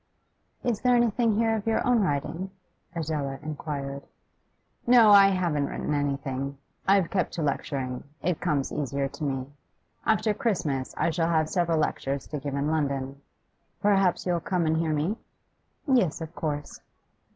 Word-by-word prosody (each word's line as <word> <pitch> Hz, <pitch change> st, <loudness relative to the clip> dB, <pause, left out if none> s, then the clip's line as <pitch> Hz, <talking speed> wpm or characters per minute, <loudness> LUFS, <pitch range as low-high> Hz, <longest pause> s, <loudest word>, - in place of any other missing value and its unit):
'Is 230 Hz, -4 st, 0 dB
there 250 Hz, -1 st, +4 dB
anything 235 Hz, -1 st, +2 dB
here 225 Hz, +1 st, +2 dB
of 220 Hz, 0 st, -4 dB
your 225 Hz, -, +1 dB
own 245 Hz, -3 st, +4 dB
writing?' 165 Hz, +2 st, -1 dB, 0.5 s
Adela 150 Hz, -4 st, -2 dB
inquired. 140 Hz, -2 st, -4 dB, 0.9 s
'No, 235 Hz, -3 st, +7 dB
I 200 Hz, -1 st, +9 dB
haven't 175 Hz, -7 st, +1 dB
written -, -, -3 dB
anything. 140 Hz, -1 st, -2 dB, 0.3 s
I've 195 Hz, -3 st, +4 dB
kept 185 Hz, -3 st, 0 dB
to 165 Hz, -, -2 dB
lecturing; 135 Hz, -3 st, -2 dB, 0.2 s
it 175 Hz, -1 st, 0 dB
comes 140 Hz, -2 st, 0 dB
easier 140 Hz, -1 st, -1 dB
to 150 Hz, -, -8 dB
me. 135 Hz, -3 st, -1 dB, 0.6 s
After 220 Hz, 0 st, +2 dB
Christmas 170 Hz, -, -1 dB
I 170 Hz, -, +1 dB
shall 165 Hz, 0 st, 0 dB
have 155 Hz, -2 st, +2 dB
several 170 Hz, -3 st, +1 dB
lectures 140 Hz, -2 st, -1 dB
to 150 Hz, -, -3 dB
give 140 Hz, 0 st, -4 dB
in 140 Hz, +2 st, 0 dB
London. 140 Hz, -3 st, -2 dB, 0.6 s
Perhaps 195 Hz, -3 st, +2 dB
you'll 175 Hz, -2 st, +1 dB
come 175 Hz, 0 st, -1 dB
and 160 Hz, 0 st, +2 dB
hear 165 Hz, -1 st, 0 dB
me?' 155 Hz, +8 st, 0 dB, 0.7 s
'Yes, 245 Hz, -, +2 dB
of 160 Hz, 0 st, -7 dB
course. 150 Hz, -3 st, -4 dB
160 Hz, 150 wpm, -27 LUFS, 140-195 Hz, 0.9 s, I